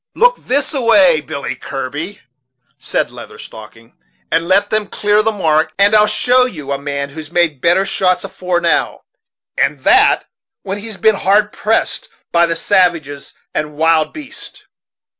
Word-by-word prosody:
"Look - - +3
this 280 +3 -1
a 275 - -1
way, 195 -9 +4
Billy 140 -4 -5
Kirby," 145 +9 -6 0.6
said - - -2
Leather - - -11
Stocking, 115 +1 -13 0.4
"and 165 - 0
let 200 +2 +2
them 215 -1 0
clear 210 +1 +1
the 220 +1 0
mark, 160 -6 0
and 200 +2 +4
I'll 210 0 +5
show 250 +4 +3
you 150 - -8
a 140 - -2
man 140 0 -4
who's 155 +1 -9
made 170 -6 0
better 175 +5 +3
shots 185 -2 0
afore 180 -1 -3
now, 170 - 0 0.5
and - - 0
that - - +4 0.4
when 195 +1 -4
he's 215 -1 -7
been 220 -1 +3
hard 205 +3 +2
pressed 220 +2 -1 0.2
by 170 0 +3
the 165 - -2
savages 165 -6 0 0.2
and 150 -1 -4
wild 160 -1 +2
beasts." 305 -1 -10
180 Hz, 160 wpm, -16 LUFS, 155-210 Hz, 0.6 s, I'll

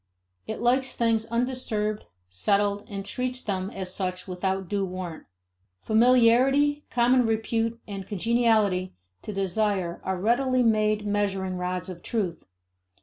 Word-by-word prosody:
It - - -4
likes 255 +3 +1
things 225 -1 +1
undisturbed, 230 -3 -2 0.2
settled, 200 - +1
and 195 -2 -5
treats 255 +3 -3
them 190 -2 -2
as 185 -3 -5
such 185 -1 -3
without 190 +1 -2
due 200 +2 -1
warrant. 180 -3 -6 0.5
Familiarity, 255 - +4
common 245 +1 +3
repute, 225 +1 -1
and 195 -2 -6
congeniality 215 -3 +1 0.3
to - - -6
desire 195 -2 -1
are 190 0 -2
readily 250 +5 +2
made 215 -2 +2
measuring 195 -2 -1
rods 180 0 -3
of 180 -2 -8
truth. 195 -6 -3
210 Hz, 125 wpm, -26 LUFS, 190-235 Hz, 0.5 s, Familiarity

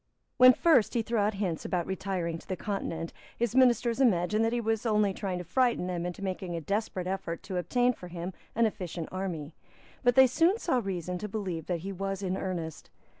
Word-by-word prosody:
When 255 0 +9
first 280 - +3
he 230 - +2
threw 230 0 -1
out 205 +1 +1
hints 185 -5 -2
about 175 -2 -1
retiring 185 -3 -2
to - - -18
the 185 - -2
Continent, 165 -4 -4 0.2
his 235 -2 0
ministers 245 -1 +4
imagined 210 -2 +3
that 225 - +2
he 240 - 0
was 225 -1 0
only 210 -4 +2
trying 190 -2 -3
to 180 - -4
frighten 240 +2 +1
them 175 -1 -2
into 180 +3 -6
making 185 -2 -3
a - - -2
desperate 200 +1 -2
effort 185 -3 -3
to 190 -2 -4
obtain 245 +7 +2
for 180 - -10
him 175 +1 -5 0.2
an 230 +1 +4
efficient 175 -6 -4
army. 170 -5 -4 0.5
But 245 -1 +4
they 265 - +9
soon 330 - +3
saw 295 - +1
reason 180 -4 -3
to 210 - -4
believe 185 -6 -4
that 175 -3 -1
he 195 +3 -5
was 195 +1 -3
in 185 -1 -1
earnest. 170 -5 -4
195 Hz, 210 wpm, -29 LUFS, 180-230 Hz, 0.5 s, When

